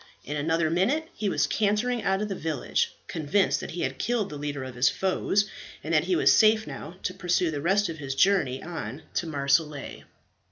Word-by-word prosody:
In 150 - -4
another 160 +2 +1
minute 275 - +1
he 210 - -2
was - - +2
cantering 220 +3 +1
out 195 +1 +1
of - - -2
the 200 - -3
village, 160 -6 -1
convinced 170 +5 +1
that - - -6
he 175 - -5
had 130 0 -2
killed 230 -4 0
the - - -6
leader 145 -1 -4
of 130 -1 -7
his 125 +2 +3
foes, 195 +2 +1 0.4
and - - -3
that - - +3
he 365 - +1
was - - +5
safe 220 0 +5
now 165 +4 -8
to 185 - -2
pursue 180 -2 +1
the 145 -2 -3
rest 195 +6 +2
of 160 -2 -6
his 135 -2 -4
journey 140 -6 +2
on 155 -6 -6
to 170 - -1
Marseilles. 140 0 0
170 Hz, 205 wpm, -27 LUFS, 145-205 Hz, 0.4 s, was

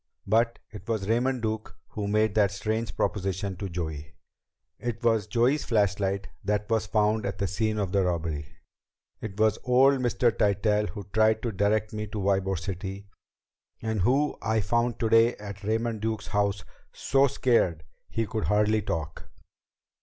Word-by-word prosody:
But 115 +3 +2
it 105 +1 -11
was 110 -4 -1
Raymond 120 +2 +1
Duke 110 0 -3
who 105 -1 -4
made 110 0 +2
that 105 -2 +4
strange 110 +3 -3
proposition 95 0 -1
to 100 +1 -4
Joey. 80 -3 -5 0.6
It 120 0 -4
was 110 -3 +2
Joey's 120 +7 +2
flashlight 100 -3 0 0.2
that 105 +1 -1
was 110 -1 +1
found 105 +1 +2
at 100 - -3
the 100 - -1
scene 110 +4 -1
of 100 -3 -1
the 100 0 +2
robbery. 80 -4 -2 0.7
It 105 -2 -7
was 110 -1 +3
old 130 +2 +4
Mr. 120 -1 +2
Tytell 105 0 +2
who 105 -1 -7
tried 110 0 +3
to 120 - -1
direct 105 +2 0
me 105 0 -4
to 105 - -6
Ybor 95 -1 +1
City 95 +2 -6 0.7
and 110 -2 -2
who 135 +9 +2
I 110 0 +1
found 120 +2 0
today 115 +1 +4
at 100 0 -9
Raymond 110 +1 -1
Duke's 110 -1 -2
house 100 -2 0 0.3
so 135 +1 +2
scared 115 - +1 0.3
he 115 - -1
could 110 0 -3
hardly 105 +1 +2
talk. 80 -6 -4
105 Hz, 160 wpm, -27 LUFS, 100-115 Hz, 0.7 s, that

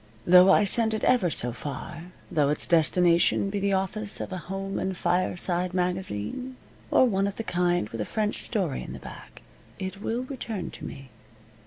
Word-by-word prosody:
Though 180 +2 +7
I - - +5
send 220 +2 +3
it 220 - -4
ever 240 -9 +3
so 120 -5 0
far 145 +7 -7 0.3
though 145 -3 +2
its 150 - 0
destination 175 +3 +3
be 205 - -2
the 200 0 0
office 200 +2 -1
of - - -5
a 185 - -4
home 195 +2 -4
and 190 -1 -3
fireside 180 0 0
magazine 180 - -2 0.3
or - - +5
one 195 -4 +1
of 200 - -4
the 225 - -4
kind 175 - 0
with 115 - -5
a - - -2
French 215 -1 -2
story 185 - -2
in - - -7
the - - -8
back, - - -12 0.3
it 190 +1 -6
will 235 +3 -2
return 235 -7 -5
to - - -9
me. 135 -2 -9
185 Hz, 185 wpm, -26 LUFS, 170-205 Hz, 0.3 s, Though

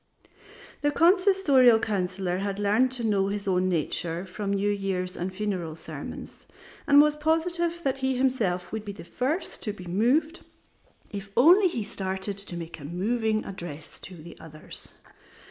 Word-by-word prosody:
The 290 - +2
Consistorial 335 - +5
Councillor 185 -3 -1
had 200 0 -2
learned 210 +5 +2
to 250 -2 -4
know 200 -3 +2
his 200 0 -3
own 185 0 +2
nature 170 +1 -1
from 195 +2 -4
New 200 +1 +1
Year's 190 -2 -2
and 180 +2 -3
funeral 185 -5 -3
sermons, 160 - -9 0.4
and 285 0 +7
was 300 0 +5
positive 340 +2 0
that 270 -1 0
he 265 0 0
himself 230 -9 0
would 220 -1 -4
be 205 -1 -6
the 200 - -10
first 265 - -2
to 210 - -3
be 185 -3 -11
moved 255 - +1 0.7
if 200 -1 -6
only 355 +10 +7
he 240 -11 -2
started 190 0 -4
to 190 -3 -7
make 165 -1 -7
a - - -10
moving 215 +6 0
address 165 -5 -7
to 170 -1 -10
others. 155 -1 -10
205 Hz, 155 wpm, -27 LUFS, 185-265 Hz, 0.7 s, and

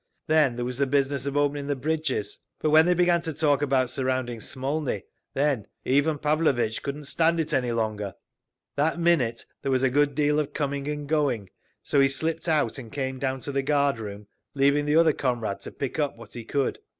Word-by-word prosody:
Then 155 -6 +3
there 120 0 -3
was 125 +1 -4
the 140 - +2
business 140 0 0
of 140 +1 -1
opening 145 0 0
the 145 - 0
bridges. 140 -7 -2 0.2
But 155 - +1
when 160 +2 +6
they 180 - +4
began 175 -1 +3
to 165 -1 -3
talk 145 -1 +2
about 130 -3 +1
surrounding 130 -3 -1
Smolny, 135 -3 -2 0.3
then 140 -6 +1 0.2
Ivan 145 +3 +2
Pavlovitch 145 -7 +1
couldn't 140 +2 -5
stand 165 +4 +1
it 160 -1 -1
any 125 -2 +1
longer. 110 -4 -2 0.6
That 160 +4 +1
minute 150 -10 +2 0.2
there 135 - -1
was 130 0 +2
a 130 - +3
good 145 +1 +2
deal 150 0 +2
of 145 -1 -2
coming 140 -1 -2
and 150 -1 -3
going, 140 - 0 0.3
so 140 - +2
he 135 - +6
slipped 160 +4 -2
out 145 -7 +1
and 115 -4 -10
came 130 -2 -3
down 130 -1 -2
to 140 - -5
the 135 0 0
guard 140 -3 +1
room, 105 -1 -7 0.3
leaving 140 +1 +3
the 150 - +2
other 165 -1 +5
comrade 120 -8 -2
to - - -8
pick 140 +3 -4
up 145 -5 0
what 115 -2 -13
he 120 -2 -7
could. 140 +2 -1
140 Hz, 205 wpm, -26 LUFS, 130-150 Hz, 0.6 s, when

